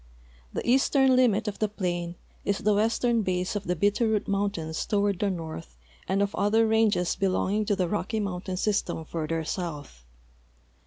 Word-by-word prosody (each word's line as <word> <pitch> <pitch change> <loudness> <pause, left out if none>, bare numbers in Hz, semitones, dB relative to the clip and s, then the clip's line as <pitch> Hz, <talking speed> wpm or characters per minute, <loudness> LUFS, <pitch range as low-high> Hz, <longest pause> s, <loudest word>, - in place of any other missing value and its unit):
The - - -4
eastern 265 +1 +4
limit 225 -4 +3
of 205 - -4
the 215 - +2
plain 175 -4 -3 0.3
is 200 -1 0
the 210 - +2
western 230 +2 +2
base 185 +2 -1
of 205 - -3
the 180 - 0
Bitterroot 210 +4 +1
mountains 195 -6 -1
toward 200 -3 +1
the 205 - +1
north 160 - -6 0.3
and 195 +1 +2
of 200 - -2
other 220 +3 +3
ranges 220 -5 +2
belonging 195 +2 0
to 205 - +1
the 185 -2 0
Rocky 215 +4 -2
mountain 185 -2 -3
s}^stem 195 -4 -1
further 165 0 -2
south. 150 - -5
200 Hz, 160 wpm, -27 LUFS, 175-215 Hz, 0.3 s, eastern